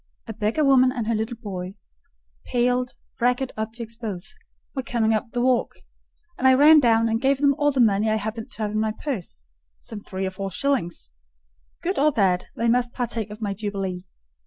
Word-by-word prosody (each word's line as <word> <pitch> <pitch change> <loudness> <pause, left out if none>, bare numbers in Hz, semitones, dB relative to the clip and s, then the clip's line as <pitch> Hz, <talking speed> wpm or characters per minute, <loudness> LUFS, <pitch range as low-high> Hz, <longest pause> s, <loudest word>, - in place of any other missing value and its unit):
A 225 - -6
beggar 220 +9 0
woman 260 -2 +5
and 245 -4 -3
her 230 - 0
little 220 +2 -2
boy—pale, 185 - -4 0.3
ragged 250 +2 +1
objects 225 +1 -5
both—were 215 +4 -8
coming 230 -3 +1
up 220 +2 -1
the 245 -1 -1
walk, 255 -1 +2 0.7
and 260 - +4
I 260 - +7
ran 300 +3 +8
down 230 -3 +3
and 225 +1 0
gave 275 0 +3
them 280 0 +3
all 290 0 +3
the 265 -2 +2
money 215 -1 +3
I 215 - +2
happened 220 +1 -4
to 220 - -5
have 210 - -1
in 215 - -1
my 215 0 0
purse—some - - -8
three 190 -1 -5
or 190 - -2
four 195 +1 -4
shillings: 180 - -2 0.7
good 370 +3 -1
or 300 +2 +4
bad, 190 -7 +1
they 235 - 0
must 245 +1 +2
partake 230 -3 -3
of 210 +2 -8
my 200 -1 -1
jubilee. 195 -3 -4
225 Hz, 180 wpm, -24 LUFS, 195-250 Hz, 0.7 s, ran